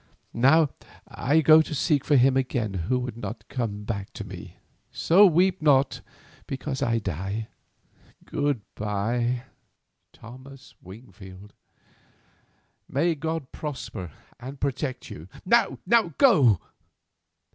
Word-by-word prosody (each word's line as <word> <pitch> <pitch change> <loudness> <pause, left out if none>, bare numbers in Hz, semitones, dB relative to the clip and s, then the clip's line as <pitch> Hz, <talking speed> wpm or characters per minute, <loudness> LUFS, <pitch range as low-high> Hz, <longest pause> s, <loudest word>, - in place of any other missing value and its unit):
Now 145 +6 +4 0.4
I 150 +4 +1
go 155 +1 +7
to 155 - -5
seek 145 -1 +1
for 150 - +2
him 130 0 +4
again 125 -5 -1 0.2
who 125 -1 0
could 120 -3 -7
not 120 0 -7
come 105 -5 -4
back 100 -2 -5
to - - -7
me, - - -10 0.3
so 195 +5 +5
weep 180 +1 +2
not 140 -3 +3 0.5
because 135 0 -4
I 115 0 +1
die. 100 +2 -4 0.8
Good 145 -5 -1
bye, 120 +4 -2 0.7
Thomas 130 +3 -14
Wingfield. 95 -1 -13 1.4
May 165 +5 +1
God 160 -2 -4
prosper 130 - -6 0.3
and 135 +3 -9
protect 135 -1 -3
you! 80 +3 -9 0.2
Now 235 +5 +3 0.4
go!" 135 - +5
130 Hz, 115 wpm, -25 LUFS, 110-150 Hz, 1.4 s, go